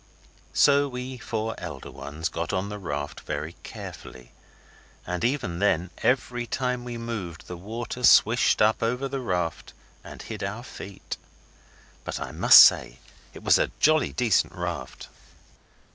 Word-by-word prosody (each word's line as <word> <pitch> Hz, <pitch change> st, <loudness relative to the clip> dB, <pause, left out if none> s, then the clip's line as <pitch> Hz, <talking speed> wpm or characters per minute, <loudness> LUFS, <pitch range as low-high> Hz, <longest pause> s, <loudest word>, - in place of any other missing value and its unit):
So 145 Hz, 0 st, +5 dB
we 125 Hz, 0 st, -6 dB
four 110 Hz, -1 st, -3 dB
elder 80 Hz, -6 st, -7 dB
ones 80 Hz, +3 st, -5 dB
got 85 Hz, 0 st, -4 dB
on 95 Hz, +1 st, -2 dB
the 105 Hz, 0 st, -6 dB
raft 75 Hz, -6 st, -4 dB
very 75 Hz, +3 st, -5 dB
carefully; 60 Hz, -2 st, -10 dB, 0.7 s
and 90 Hz, 0 st, -3 dB
even 120 Hz, -10 st, -1 dB
then, 90 Hz, -3 st, +1 dB
every 125 Hz, -1 st, 0 dB
time 125 Hz, -1 st, -2 dB
we 120 Hz, -1 st, -6 dB
moved 110 Hz, -8 st, -6 dB
the 90 Hz, -, -7 dB
water 115 Hz, +7 st, -6 dB
swished 115 Hz, -1 st, +5 dB
up 110 Hz, +1 st, +2 dB
over 125 Hz, +4 st, -1 dB
the 135 Hz, 0 st, -4 dB
raft 90 Hz, -9 st, -3 dB, 0.3 s
and -, -, -11 dB
hid 105 Hz, -3 st, -6 dB
our 105 Hz, +4 st, -4 dB
feet. 100 Hz, -5 st, -8 dB, 0.9 s
But -, -, -4 dB
I -, -, -5 dB
must -, -, +9 dB
say -, -, +3 dB, 0.4 s
it -, -, -11 dB
was -, -, +5 dB
a -, -, +1 dB
jolly 155 Hz, -2 st, +3 dB
decent 115 Hz, -6 st, +1 dB
raft. 85 Hz, -7 st, -5 dB
105 Hz, 145 wpm, -26 LUFS, 85-125 Hz, 0.9 s, must